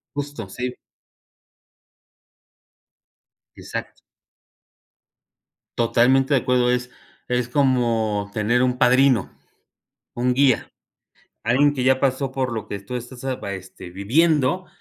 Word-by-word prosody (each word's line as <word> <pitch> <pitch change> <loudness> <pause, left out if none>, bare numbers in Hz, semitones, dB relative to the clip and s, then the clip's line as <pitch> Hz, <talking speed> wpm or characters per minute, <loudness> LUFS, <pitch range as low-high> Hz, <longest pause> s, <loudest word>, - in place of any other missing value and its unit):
Justo, 145 -7 -5
sí. 125 +4 -4 2.8
Exacto. - - -7 1.8
Totalmente 130 +4 +3
de 135 - +3
acuerdo. 125 -1 +2
Es, 125 0 -1 0.4
es 125 -1 -1
como 115 -6 +1
tener 115 +4 +1
un 125 0 0
padrino, 125 -3 +3 0.8
un 125 +1 0
guía, 135 -2 +2 0.7
alguien 135 +6 +3
que 130 -3 -2
ya 130 0 +4
pasó 135 0 0
por 130 -2 -2
lo 110 - -4
que 100 - -4
tú 100 +6 -8
estás 125 +1 -9
apa 130 -7 -3
este, 95 -1 -10
viviendo, 150 - +1
125 Hz, 105 wpm, -22 LUFS, 115-135 Hz, 2.8 s, ya